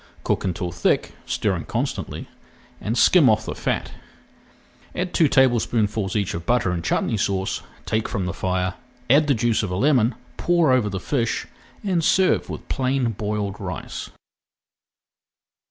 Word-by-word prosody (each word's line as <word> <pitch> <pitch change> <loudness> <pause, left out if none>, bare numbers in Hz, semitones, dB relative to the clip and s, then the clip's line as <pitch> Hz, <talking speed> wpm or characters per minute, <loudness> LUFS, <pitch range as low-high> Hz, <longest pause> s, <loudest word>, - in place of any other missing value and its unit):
Cook - - 0
until 90 -1 -2
thick, 85 - 0
stirring - - -1
constantly, - - -3 0.5
and 115 +3 -2
skim 155 0 +6
off 110 0 +2
the - - -3
fat. - - -2 1.0
Add 180 0 -2
two 160 - +4
tablespoonfuls 115 -6 +2
each 100 -3 0
of 85 - -4
butter 120 -6 +2
and 85 -2 -2
chutney 110 - 0
sauce, 95 -1 -1 0.2
take 110 0 -1
from 100 -6 -2
the 90 - -2
fire, 90 0 -1 0.4
add 145 +2 +5
the 140 - +3
juice 115 0 +1
of 105 - -3
a 90 - -2
lemon, 125 0 +3 0.2
pour 170 -5 +3
over 125 -5 +3
the 95 -1 -3
fish, 120 +3 -1 0.4
and 180 -5 +1
serve 190 +4 +3
with - - -7
plain 130 -2 0
boiled 105 -1 -3
rice. 90 -7 -5
110 Hz, 150 wpm, -23 LUFS, 95-130 Hz, 1.0 s, skim